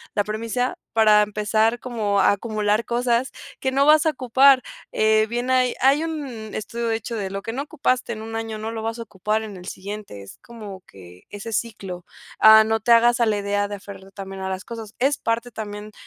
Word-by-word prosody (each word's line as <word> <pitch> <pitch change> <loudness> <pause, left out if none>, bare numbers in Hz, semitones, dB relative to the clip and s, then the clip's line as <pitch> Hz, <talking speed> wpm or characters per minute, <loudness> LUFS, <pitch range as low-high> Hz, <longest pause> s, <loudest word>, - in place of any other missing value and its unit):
la 205 - +2
primicia 230 +4 -2 0.2
para 215 -2 +5
empezar 215 +2 0
como 215 -5 -1
a - - +5
acumular 210 +1 0
cosas 240 +1 0 0.3
que 265 - -1
no 275 +1 +3
vas 305 +1 +6
a - - +4
ocupar. 260 0 +4 0.3
Eh, 215 0 +3
bien, 240 +2 -2
hay 255 -1 +3
hay 275 +4 +4
un 315 -3 -4 0.3
estudio 235 +2 -4
de 225 - +1
hecho, 230 +1 -5
de 200 -3 -3
lo 195 +1 -5
que 225 - -5
no 270 +3 -3
ocupaste 255 -5 -1
en 215 - -8
1 225 0 -7
año 225 -1 -4
no 220 +1 -5
lo 225 -1 -5
vas 225 +1 -3
a - - -4
ocupar 215 +1 -2
en 210 -3 -8
el 180 0 -11
siguiente, 200 - -7
es 100 - -12
como 215 -6 -10
que 90 -2 -15
ese 205 +2 -7
ciclo. 195 -5 -4 0.4
Ah, 220 0 +9
no 220 +1 0
te 230 +3 0
hagas 235 +1 +4
a 235 - +3
la 210 -1 +1
idea 205 0 -1
de 205 - -5
aferrarte 195 -1 -12
también 195 -1 -8
a 190 - -3
las 190 +1 -5
cosas, 225 -2 -8
es 275 +3 +2
parte 230 +1 -2
también 210 -1 -7
220 Hz, 215 wpm, -22 LUFS, 205-240 Hz, 0.4 s, Ah